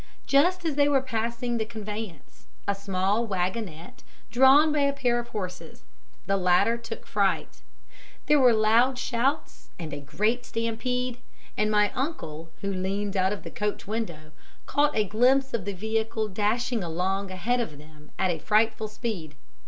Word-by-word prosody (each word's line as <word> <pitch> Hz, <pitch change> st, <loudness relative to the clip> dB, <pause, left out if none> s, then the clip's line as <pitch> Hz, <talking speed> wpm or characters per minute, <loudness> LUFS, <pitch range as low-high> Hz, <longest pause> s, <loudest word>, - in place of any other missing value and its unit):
Just 345 Hz, +6 st, +3 dB
as 320 Hz, -, +1 dB
they 285 Hz, 0 st, +3 dB
were 270 Hz, -2 st, +3 dB
passing 235 Hz, 0 st, -2 dB
the -, -, +1 dB
conveyance 210 Hz, -, -8 dB, 0.2 s
a 200 Hz, -, +3 dB
small 195 Hz, +2 st, 0 dB
wagonette 190 Hz, +2 st, -3 dB, 0.3 s
drawn 265 Hz, +5 st, +6 dB
by 300 Hz, -, +1 dB
a 280 Hz, -1 st, +2 dB
pair 245 Hz, -3 st, +1 dB
of 235 Hz, -, -6 dB
horses, 185 Hz, -5 st, -7 dB, 0.4 s
the 195 Hz, 0 st, +1 dB
latter 180 Hz, +5 st, +3 dB
took 230 Hz, -1 st, -8 dB
fright; 200 Hz, -2 st, 0 dB, 0.6 s
there 295 Hz, 0 st, +4 dB
were 255 Hz, -2 st, +6 dB
loud 230 Hz, +4 st, +4 dB
shouts 260 Hz, +4 st, -1 dB
and 160 Hz, -4 st, -6 dB
a 145 Hz, -, -4 dB
great 210 Hz, -, -1 dB
stampede, 245 Hz, +2 st, -2 dB, 0.4 s
and 210 Hz, 0 st, +1 dB
my 210 Hz, -1 st, +3 dB
uncle, 165 Hz, -, -4 dB
who 200 Hz, 0 st, -2 dB
leaned 195 Hz, +2 st, -2 dB
out 190 Hz, 0 st, +2 dB
of 205 Hz, -, -4 dB
the -, -, -8 dB
coach 210 Hz, 0 st, -3 dB
window, 175 Hz, -8 st, -4 dB, 0.3 s
caught 295 Hz, +1 st, +2 dB
a 215 Hz, -, +4 dB
glimpse 260 Hz, +6 st, +3 dB
of 220 Hz, -6 st, -2 dB
the 205 Hz, -, -2 dB
vehicle 220 Hz, +2 st, -1 dB
dashing 220 Hz, +3 st, 0 dB
along 185 Hz, +4 st, -1 dB
ahead 205 Hz, +7 st, 0 dB
of 160 Hz, -12 st, -3 dB
them 150 Hz, 0 st, -16 dB
at 185 Hz, -, +2 dB
a 165 Hz, -, -3 dB
frightful 220 Hz, +4 st, +2 dB
speed. 210 Hz, -, -5 dB
220 Hz, 160 wpm, -27 LUFS, 190-245 Hz, 0.6 s, drawn